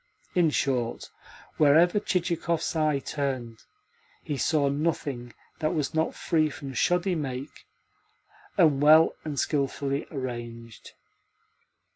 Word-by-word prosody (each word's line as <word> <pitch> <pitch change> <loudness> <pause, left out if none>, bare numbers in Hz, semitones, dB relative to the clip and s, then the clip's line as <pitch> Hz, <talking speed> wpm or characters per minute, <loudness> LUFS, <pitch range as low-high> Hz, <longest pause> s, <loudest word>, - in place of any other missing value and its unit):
In 175 -4 +3
short, 130 -5 -1 0.5
wherever 165 +6 +5
Chichikov's 170 -3 -1
eye 155 -2 +2
turned 130 -5 -4 0.6
he 150 - -3
saw 145 +1 +1
nothing 140 -4 -2 0.3
that 155 +2 0
was 150 -3 -1
not 160 0 0
free 155 -3 +1
from 140 -2 -8
shoddy 180 +7 +1
make 135 -3 -5 0.9
and 155 -7 +4
well 155 +2 +6
and 150 -3 -3
skilfully 140 0 -1
arranged. 120 -4 -7
145 Hz, 105 wpm, -27 LUFS, 135-160 Hz, 0.9 s, well